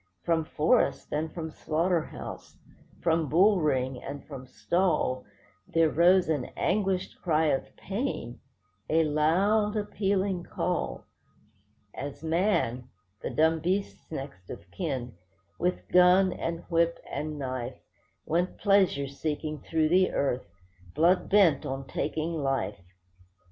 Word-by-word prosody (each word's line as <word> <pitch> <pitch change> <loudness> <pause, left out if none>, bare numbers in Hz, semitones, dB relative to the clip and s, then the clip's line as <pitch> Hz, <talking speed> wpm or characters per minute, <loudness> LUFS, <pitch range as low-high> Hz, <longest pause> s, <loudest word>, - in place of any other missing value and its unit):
From 165 -2 +1
forest, 160 +11 +1
and 155 +1 -1
from 160 -2 -5
slaughter 165 +3 0
house, - - -9 0.5
from 160 -3 +2
bull 190 +3 +4
ring, 130 -4 0
and 140 0 -7
from 130 -3 -9
stall, 155 -4 0 0.4
There 165 -2 +2
rose 180 +3 +5
an 150 -6 0
anguished 195 -3 0
cry 160 -3 +2
of 135 - -4
pain, 195 - -4 0.5
a 165 +1 +4
loud, 190 +8 +2
appealing 195 -3 -1
call; - - -2 0.9
As 140 +2 -7
man—the 125 - -1
dumb 160 +1 +2
beast's 185 +4 -2
next 135 - -7
of 90 - -9
kin—with 95 - -4
gun, 180 +1 +5
and 165 0 -3
whip, 170 0 +1
and 150 0 -4
knife, 130 -2 -4 0.5
Went 175 +3 0
pleasure 195 -9 +3
seeking 150 +2 -4
through 160 -1 +1
the 185 +2 +3
earth, 130 -7 0 0.5
blood 175 +3 +3
bent 195 -7 +5
on 135 -1 -4
taking 155 +5 -2
life. 135 -8 -1
160 Hz, 115 wpm, -28 LUFS, 135-180 Hz, 0.9 s, rose